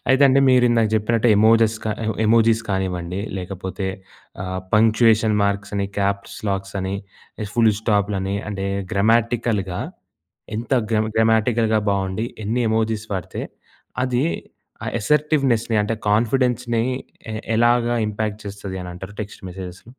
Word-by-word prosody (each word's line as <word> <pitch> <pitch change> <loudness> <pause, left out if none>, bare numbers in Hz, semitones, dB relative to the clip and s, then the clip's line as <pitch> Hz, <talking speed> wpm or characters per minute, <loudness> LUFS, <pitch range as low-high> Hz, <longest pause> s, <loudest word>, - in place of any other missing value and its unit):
అయితే 130 +2 +4
అండి 135 0 +4
మీరు 125 -1 +5
ఇందాక 115 -2 +3
జెప్పినట్టు 110 +2 +2
ఎమోజీస్ 110 +1 +5
క - - -4 0.4
ఎమోజీస్ 115 0 +4
కానివ్వండి 90 -2 -2 0.2
లేకపోతే 95 +1 -5 0.6
ఆహ్, 95 0 -3
పంక్చుయేషన్ 110 0 +4
మార్క్స్ 100 0 -1
అని, 100 0 0
క్యాప్స్‌లాక్స్ 100 0 -2
అని, 95 +1 -2 0.5
ఇగ 105 - -4
ఫుల్ 115 -2 +4
స్టాప్‌లని 100 -3 0
అంటే, 100 -1 -3 0.3
గ్రమాటికల్‌గా 110 -3 +1 0.8
ఎంత 115 +2 -6 0.2
గ్రం 110 -1 +2
గ్రమటికల్‌గా 110 0 +3
బాగుండి 100 +3 -1 0.2
ఎన్ని 120 +4 0
ఎమోజీస్ 110 -1 0
వాడితే, 95 -3 -4 0.6
అది 125 +2 +1 0.6
ఆ - - -5
అసర్టివ్నెస్‌ని 135 -4 +2
అంటే 110 +2 -2
కాన్ఫిడెన్స్‌‌ని 120 +1 +1 0.5
ఎ - - -4 0.2
ఎలాగా 120 +1 +3
ఇంపాక్ట్ 105 0 -3
చేస్తది 100 -1 -6
అని 90 - -7
అంటారు, 95 +3 -9
టెక్స్ట్ 105 - -11
మెసేజెస్‌? 90 0 -8
110 Hz, 125 wpm, -21 LUFS, 100-115 Hz, 0.8 s, మీరు